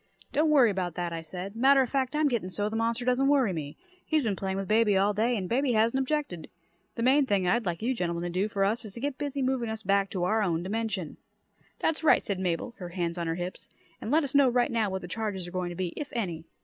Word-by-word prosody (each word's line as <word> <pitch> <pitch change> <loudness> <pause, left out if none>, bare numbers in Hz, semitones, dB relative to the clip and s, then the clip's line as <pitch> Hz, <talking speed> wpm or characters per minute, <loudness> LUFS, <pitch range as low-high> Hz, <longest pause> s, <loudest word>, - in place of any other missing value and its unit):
"Don't 310 +2 +2
worry 265 -7 +5
about 180 -4 -3
that," 175 -1 -3
I 165 - -4
said. 180 +5 -7
"Matter 270 +3 +5
of 250 - -5
fact, 265 0 0
I'm 305 0 +3
getting 235 -9 -1
so 205 +3 -2
the 220 - -5
monster 230 +2 -1
doesn't 255 +2 +2
worry 270 -8 +3
me. 150 -3 -6 0.3
He's 310 -2 +1
been 215 -4 0
playing 190 0 -3
with 195 -1 -3
baby 215 -2 +3
all 200 +2 +3
day 230 +4 +1
and 185 -3 -3
baby 255 +4 +1
hasn't 230 +4 +2
objected. 270 - -2 0.5
The 230 - -2
main 270 +2 +4
thing 195 -5 +1
I'd 220 +3 +1
like 175 +4 -3
you 255 +3 +1
gentlemen 170 -6 -2
to 175 - -2
do 185 +4 0
for 200 -2 -1
us 225 +4 0
is 210 -3 -7
to 235 - -7
get 280 +1 -3
busy 285 -2 -2
moving 255 -3 0
us 220 0 -5
back 195 0 +2
to 185 -3 -3
our 215 +5 +2
own 170 -4 0
dimension." 205 -4 -3 0.6
"That's 320 0 -1
right," 320 - +4
said 200 -2 -2
Mabel, 180 +5 -2
her 180 -2 -6
hands 175 -1 -3
on 170 - -2
her 165 - -1
hips. 180 +1 -6 0.3
"And - - -5
let 310 +4 +3
us 275 - -3
know 280 -2 +5
right 245 0 +1
now 225 -3 +1
what 190 -1 -4
the - - -6
charges 195 -2 -3
are - - -8
going 180 -1 -2
to 175 - -7
be, 185 0 -2
if 295 - -5
any." 175 -8 -3
215 Hz, 265 wpm, -28 LUFS, 180-255 Hz, 0.6 s, worry